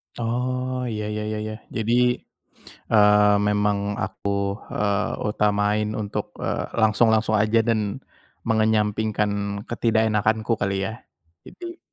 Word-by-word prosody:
Oh. 125 +2 -2
Iya 105 -1 -3
iya 105 - -3
iya 110 - -3
iya. 110 - -4 0.2
Jadi, 115 +1 0 1.0
eee, 105 -1 +6
memang 105 0 +2 0.3
aku, 95 +1 -4 0.4
eee, 105 +1 0 0.2
utamain 105 0 +1
untuk, 100 -1 -3 0.2
eee, - - -1 0.2
langsung-langsung 110 0 +3
aja, 110 +2 +3
dan 115 -1 +2 0.7
mengenyampingkan 110 -1 +1 0.4
ketidakenakanku 110 -1 +1
kali, 100 0 0
ya. 110 - -4 0.5
Jadi 345 0 -9
110 Hz, 105 wpm, -23 LUFS, 105-115 Hz, 1.0 s, eee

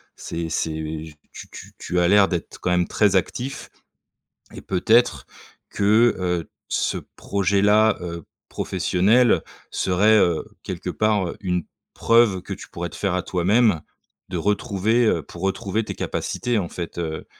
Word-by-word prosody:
C'est 85 0 -5
c'est 80 0 -3 0.3
tu - - -10
tu - - -11
tu 90 - -1
as 85 - +3
l'air 100 +1 +5
d'être 90 -3 -4
quand - - -2
même 90 -1 +2
très 105 -3 +2
actif, 125 +9 -2 0.8
et - - -9
peut-être 95 - +2 0.4
que, 110 +4 +3
heu, 90 -2 -2 0.2
ce - - 0 0.2
projet 100 0 0
là, 105 +1 +4
heu, 85 -2 -6 0.3
professionnel 100 +6 +2 0.3
serait, 105 +4 +3
heu, 85 -4 +1 0.2
quelque - - -5
part, 105 -4 +1
heu, - - -7
une 90 -3 -1 0.3
preuve 115 -5 +3
que - - -6
tu - - -10
pourrais 85 0 -5
te - - -12
faire 95 -3 -1
à 90 - 0
toi-même, 95 0 +2 0.5
de 90 - -3
retrouver, 105 +4 +1
heu, 85 -6 +1
pour 85 - -12
retrouver 95 +3 -1
tes - - -5
capacités 120 -2 -2
en 85 -4 -4
fait, 85 -1 -7
heu 80 -2 -4
95 Hz, 155 wpm, -23 LUFS, 85-110 Hz, 0.8 s, l'air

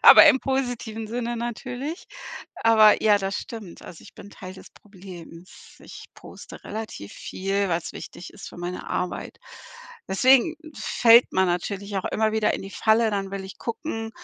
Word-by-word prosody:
aber - - +10
im - - +5
positiven 245 -5 -3
Sinne 240 +1 -3
natürlich. 250 - -5 0.6
Aber 220 -2 +6
ja, 210 -2 +5
das 195 -1 -2
stimmt. 215 -7 -8
Also, 170 - -11
ich - - -15
bin 200 - -12
Teil 185 -1 -10
des - - -14
Problems. 185 -3 -13
Ich - - -11
poste - - -12
relativ 215 - -7
viel, 195 +1 -2
weil's 165 -1 -2
wichtig 180 - -9
ist - - -10
für - - -13
meine 175 +1 -6
Arbeit. 180 - -3 0.7
Deswegen 260 - +4 0.2
fällt 235 -1 +5
man 190 0 +3
natürlich 200 +3 -3
auch 190 - -2
immer 220 0 0
wieder 220 -1 +1
in - - -5
die 195 - -8
Falle. 220 +1 +2
Dann 195 -2 -2
will 195 -1 -5
ich 190 - -10
gucken, 225 -2 -4
210 Hz, 165 wpm, -24 LUFS, 190-230 Hz, 0.7 s, aber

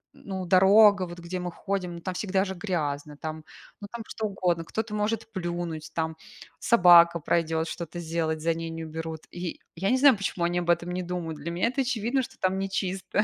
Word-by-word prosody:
ну 190 -2 -6
дорога, 195 +1 +6
вот 175 0 -9
где 175 +2 -5
мы 180 0 -4
ходим, 180 -2 -3
там 185 +1 -3
всегда 190 0 0
же 190 - -4
грязно, 150 -6 -3
там, 155 +1 -6 0.4
ну 205 - -6
там 235 -1 -6
что 220 - -3
угодно. 180 -4 0
Кто-то 220 +5 -4
может 220 +1 -1
плюнуть, 175 -4 -4
там, 160 -1 -1 0.4
собака 175 -5 +6
пройдет, 160 0 0
что-то 170 0 -6
сделать, 160 -1 -2
за 165 +1 +2
ней 165 0 -5
не 165 0 -6
уберут. 160 0 -6
И 175 -1 -5 0.2
я 190 +4 -1
не 255 - +3
знаю, 275 -1 +7
почему 190 -3 -2
они 175 +1 0
об 175 -1 -4
этом 175 +1 +2
не 180 +1 -2
думают. 175 -3 -4
Для 155 +4 -5
меня 175 +6 0
это 270 +2 -1
очевидно, 245 +1 0
что 260 +1 -8
там 190 +1 +1
не 195 0 -2
чисто. 190 +1 -1
175 Hz, 205 wpm, -27 LUFS, 165-195 Hz, 0.4 s, знаю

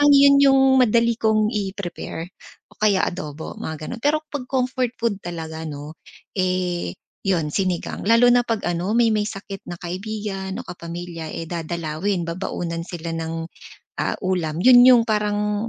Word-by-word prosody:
parang 290 - +7
'yon 280 0 +7
'yong 270 -1 +6 0.2
madali 235 -1 +3
kong 215 -1 +2
i-prepare 195 -5 -4 0.4
o - - -21
kaya 205 -2 +3
adobo, 155 -4 -7
mga 155 -1 -5
gano'n. 240 - -6
Pero 305 +1 +3
'pag 285 -4 -4
comfort 255 -1 0
food 230 -3 +1
talaga, 160 -2 -5
'no, 150 0 -7 0.4
eh, 180 - -1 0.3
yon 170 -6 +1
sinigang. 185 +1 -2
Lalo 230 +3 +6
na 245 0 +4
'pag 225 -3 -1
ano, 175 +4 -1
may 235 -1 +4
may 210 -1 +1
sakit 195 -2 -7
na 175 - -6
kaibigan 195 +1 -4
o - - -5
kapamilya, 170 -1 -7
eh, 165 -1 -5
dadalawin, 170 +2 -2
babaunan 170 -1 -3
sila 170 -1 -6
ng 165 0 -4 0.5
ah, - - -1
ulam, 170 -4 -1
'yon 245 -1 +9
'yong 245 -2 +8
parang 210 0 0
190 Hz, 155 wpm, -22 LUFS, 170-225 Hz, 0.5 s, yon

